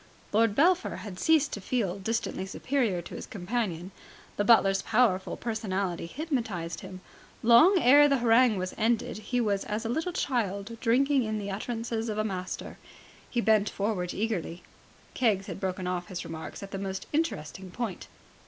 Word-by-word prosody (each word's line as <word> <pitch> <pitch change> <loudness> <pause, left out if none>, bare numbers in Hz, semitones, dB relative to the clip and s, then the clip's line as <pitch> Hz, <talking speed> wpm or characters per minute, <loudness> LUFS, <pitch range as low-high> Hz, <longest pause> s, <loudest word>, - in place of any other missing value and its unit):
Lord 220 -1 +3
Belpher 355 +6 +3
had 185 -3 -7
ceased 310 +2 +3
to 205 - -4
feel 200 -4 -1
distantly 220 -2 -2
superior 215 -5 -1
to - - -10
his - - -7
companion. 190 -3 -3 0.4
The 205 - 0
butler's 195 -3 +5
powerful 215 -5 +1
personality 195 -6 -2
hypnotized 225 - -3
him. 185 -1 -9 0.4
Long 240 - +7
ere 290 +1 +7
the 280 -1 +3
harangue 235 -2 +4
was 185 0 -3
ended, 225 -1 0
he 245 +3 -2
was 205 -4 0
as 215 +2 -3
a - - -1
little 320 +8 -1
child 230 - -2
drinking 270 +4 +3
in 215 -2 -2
the 200 -1 -4
utterances 230 +2 -3
of 215 - -3
a 215 - +1
master. 185 -3 -5 0.5
He 240 - 0
bent 215 -2 +3
forward 195 -4 -2
eagerly. 190 -5 -3 0.5
Keggs 210 -6 +1
had - - -6
broken 185 -1 -3
off 180 -1 -2
his 185 -2 -6
remarks 160 +4 -7
at 195 - -9
the 195 - -4
most 190 -1 -4
interesting 190 - -2
point. 205 -1 -5
215 Hz, 165 wpm, -28 LUFS, 190-240 Hz, 0.5 s, Long